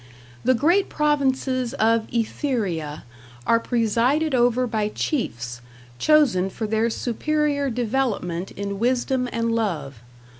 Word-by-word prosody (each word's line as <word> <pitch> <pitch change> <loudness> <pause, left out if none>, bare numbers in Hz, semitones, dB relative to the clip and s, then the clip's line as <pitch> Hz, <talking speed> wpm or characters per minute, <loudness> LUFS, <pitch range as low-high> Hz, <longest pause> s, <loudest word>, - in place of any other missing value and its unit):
The 255 - +4
great 345 - +2
provinces 265 -4 0
of 225 -2 +2
Etheria 210 - -2 0.4
are 230 - +4
presided 245 +7 +1
over 245 0 +3
by 220 -3 -1
chiefs, 125 - -3 0.4
chosen 270 -12 +4
for 220 - -4
their 220 +2 +1
superior 285 +4 0
development 225 -8 -1
in 200 0 -5
wisdom 250 +1 +1
and 230 0 -1
love. 160 - -2
235 Hz, 110 wpm, -23 LUFS, 210-265 Hz, 0.4 s, The